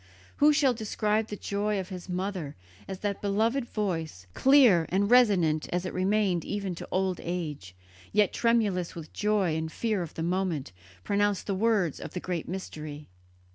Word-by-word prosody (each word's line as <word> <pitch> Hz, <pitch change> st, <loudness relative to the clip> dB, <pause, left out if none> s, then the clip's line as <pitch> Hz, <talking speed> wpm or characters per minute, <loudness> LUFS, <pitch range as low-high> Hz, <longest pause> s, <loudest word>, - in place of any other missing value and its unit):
Who 295 Hz, +1 st, +6 dB
shall 280 Hz, -3 st, +3 dB
describe 215 Hz, -1 st, -1 dB
the 210 Hz, -, -5 dB
joy 205 Hz, 0 st, -1 dB
of 185 Hz, -, -5 dB
his 185 Hz, -1 st, -8 dB
mother 180 Hz, -5 st, -3 dB, 0.3 s
as 190 Hz, -, -6 dB
that 205 Hz, -1 st, -2 dB
beloved 225 Hz, +6 st, +1 dB
voice, 165 Hz, -, -3 dB
clear 255 Hz, -, +5 dB
and 200 Hz, +4 st, +1 dB
resonant 185 Hz, -11 st, +4 dB
as 180 Hz, +1 st, -1 dB
it 185 Hz, -, -4 dB
remained 190 Hz, -2 st, +1 dB
even 200 Hz, -3 st, -3 dB
to 170 Hz, -, -8 dB
old 185 Hz, -1 st, 0 dB
age, 150 Hz, -, -5 dB, 0.4 s
yet 210 Hz, -1 st, +3 dB
tremulous 210 Hz, -7 st, +1 dB
with 165 Hz, -2 st, -6 dB
the -, -, -23 dB
joy 205 Hz, -6 st, +1 dB
and 160 Hz, 0 st, -3 dB
fear 215 Hz, -1 st, -1 dB
of 170 Hz, -, -7 dB
the 160 Hz, -, -3 dB
moment, 175 Hz, -, -1 dB, 0.3 s
pronounced 205 Hz, -1 st, +1 dB
the 200 Hz, -, -1 dB
words 195 Hz, -5 st, +1 dB
of -, -, -8 dB
the -, -, -1 dB
great 175 Hz, -3 st, -4 dB
Mystery? 155 Hz, -5 st, -7 dB
190 Hz, 175 wpm, -28 LUFS, 170-210 Hz, 0.4 s, Who